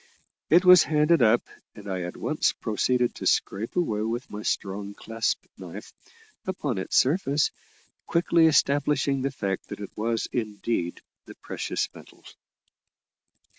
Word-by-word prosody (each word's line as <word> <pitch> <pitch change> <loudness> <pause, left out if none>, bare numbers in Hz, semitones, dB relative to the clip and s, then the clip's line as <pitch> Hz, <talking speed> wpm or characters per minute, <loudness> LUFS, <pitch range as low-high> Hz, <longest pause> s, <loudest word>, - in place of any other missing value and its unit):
It 175 +3 +5
was 180 -2 +9
handed 150 +1 +3
up, 115 +1 +4 0.3
and 105 -1 -11
I 95 -2 -3
at 90 0 -6
once - - 0
proceeded 125 +3 0
to - - -4
scrape 105 +4 0
away 110 -13 0
with 115 +4 -3
my 105 - -6
strong 100 0 -3
clasp 115 0 -2
knife - - -9 0.5
upon 145 - -2
its 95 - -3
surface, 145 0 +2 0.6
quickly 170 -1 +4
establishing 140 -2 +2
the 135 - 0
fact 100 -8 -3
that - - -7
it 100 - -8
was 115 +1 -1
indeed 105 -5 -2 0.3
the - - -11
precious - - -3
metal. - - -16
120 Hz, 135 wpm, -26 LUFS, 105-150 Hz, 0.6 s, was